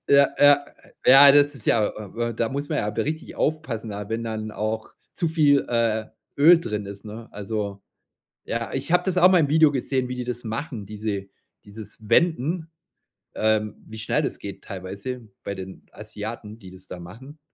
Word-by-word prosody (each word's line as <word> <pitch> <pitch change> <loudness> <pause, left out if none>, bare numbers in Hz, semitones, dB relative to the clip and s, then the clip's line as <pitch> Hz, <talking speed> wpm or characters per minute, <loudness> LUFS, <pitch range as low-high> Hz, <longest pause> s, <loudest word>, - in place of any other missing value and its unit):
Ja, 140 0 +6
ja. 145 0 +6 0.4
Ja, 140 +2 +9
das 145 0 +4
ist 125 - -11
ja 110 -2 +3
äh, 105 -3 -9
wa 120 0 -1
da 115 0 -1
muss 140 +3 -4
man - - -1
ja 105 - -1
richtig 155 +9 -3
aufpassen, 145 -8 -2
da, 100 0 -6
wenn 115 +1 -3
dann 110 -1 -4
auch 110 +1 -3 0.2
zu 170 -4 0
viel, 150 -3 +3
äh, 115 -2 +1 0.3
Öl 165 +4 +7
drin 105 -10 -4
ist, 100 +1 -9
ne? 110 +2 -9
Also, 100 -1 -4 0.6
ja, 115 0 -3
ich 135 +4 -4
hab 180 0 +4
das 190 -2 -1
auch 180 +1 +7
mal 185 - +5
im 150 -4 +2
Video 155 +1 +5
gesehen, 130 -1 -1
wie 125 - -4
die 125 - -4
das 120 0 -5
machen, 115 -1 -5
diese 105 -1 -4 0.4
dieses 105 +1 -11
Wenden 165 - +1 0.7
ähm, 110 -1 +1
wie 110 - -9
schnell 110 - 0
das - - -3
geht - - -8
teilweise 100 +6 -7 0.2
bei 100 - -4
den 95 0 -9
Asiaten, 110 +1 -8
die 95 -4 -12
das 95 0 -14
da 90 - -8
machen. 120 - -12
115 Hz, 190 wpm, -24 LUFS, 105-145 Hz, 0.7 s, Ja